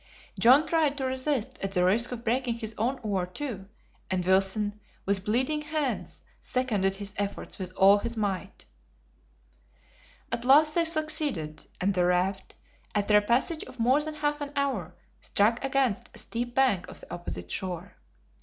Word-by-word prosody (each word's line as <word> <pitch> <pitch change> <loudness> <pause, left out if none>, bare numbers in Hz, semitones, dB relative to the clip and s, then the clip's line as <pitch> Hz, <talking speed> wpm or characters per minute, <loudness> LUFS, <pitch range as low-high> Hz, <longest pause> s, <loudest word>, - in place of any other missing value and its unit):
John 265 +6 +6
tried 310 -3 +1
to 265 - -1
resist 260 -1 -1
at 195 0 -3
the 180 -1 +3
risk 225 +7 +2
of 240 -1 -6
breaking 240 +1 0
his 225 -1 -5
own 245 +6 -1
oar, 195 -4 -1
too, 195 -1 -5 0.4
and 185 -1 -1
Wilson, 195 +3 +2 0.3
with 195 -1 +1
bleeding 260 +9 +1
hands, 300 -4 -3 0.2
seconded 210 -7 0
his 200 0 -5
efforts 200 0 -4
with 185 -1 -5
all 200 +2 +7
his 235 +1 -4
might. 200 -3 -3 1.7
At 235 - -2
last 300 +4 +6
they 335 0 +3
succeeded, 310 - 0
and 195 +2 +1
the 180 -1 +2
raft, 185 +2 0 0.4
after 205 0 +2
a 210 - +7
passage 255 - +1
of 255 - -13
more 255 +6 +3
than 310 0 -3
half 295 -1 -1
an 285 -1 -4
hour, 235 - -1 0.2
struck 225 +5 +1
against 270 -5 0
the - - -14
steep 240 +1 -4
bank 250 -10 +2
of - - -7
the - - -10
opposite 90 - -6
shore. 185 0 -5
230 Hz, 165 wpm, -28 LUFS, 195-270 Hz, 1.7 s, all